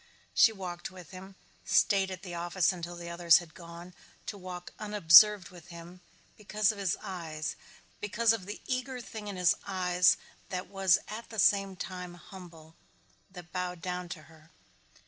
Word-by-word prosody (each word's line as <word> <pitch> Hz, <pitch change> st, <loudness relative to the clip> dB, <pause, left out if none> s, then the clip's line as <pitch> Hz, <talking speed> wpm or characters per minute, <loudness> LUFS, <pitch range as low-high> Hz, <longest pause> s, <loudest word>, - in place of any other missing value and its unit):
She 225 Hz, -, +6 dB
walked 180 Hz, -4 st, -6 dB
with 185 Hz, -3 st, -13 dB
him, 190 Hz, +1 st, -11 dB, 0.3 s
stayed 195 Hz, -2 st, +3 dB
at 185 Hz, -1 st, -8 dB
the 180 Hz, -3 st, -7 dB
office 175 Hz, +1 st, +1 dB
until 175 Hz, -1 st, -7 dB
the 170 Hz, 0 st, -7 dB
others 170 Hz, -1 st, +6 dB
had 170 Hz, -3 st, -7 dB
gone 170 Hz, +1 st, -11 dB, 0.3 s
to -, -, -5 dB
walk 180 Hz, -2 st, -8 dB
unobserved 210 Hz, -1 st, +6 dB
with 175 Hz, -2 st, -14 dB
him, 175 Hz, +1 st, -12 dB, 0.4 s
because 210 Hz, +1 st, +1 dB
of 210 Hz, -, -10 dB
his 190 Hz, -3 st, 0 dB
eyes, 160 Hz, -4 st, -5 dB, 0.4 s
because 220 Hz, +2 st, +2 dB
of 195 Hz, -5 st, -5 dB
the 205 Hz, -, -7 dB
eager 255 Hz, 0 st, -3 dB
thing 220 Hz, -3 st, -8 dB
in 200 Hz, -, -5 dB
his 180 Hz, -1 st, +3 dB
eyes 180 Hz, -2 st, +3 dB, 0.3 s
that 185 Hz, -1 st, -4 dB
was 190 Hz, -1 st, +3 dB
at 220 Hz, +2 st, -8 dB
the 220 Hz, -, -9 dB
same 195 Hz, -1 st, +3 dB
time 180 Hz, -1 st, -7 dB
humble, 170 Hz, -4 st, -13 dB, 0.6 s
that 180 Hz, -2 st, -12 dB
bowed 180 Hz, -1 st, -3 dB
down 180 Hz, -1 st, -4 dB
to 160 Hz, -3 st, -8 dB
her. 160 Hz, 0 st, -19 dB
180 Hz, 165 wpm, -30 LUFS, 175-200 Hz, 0.6 s, She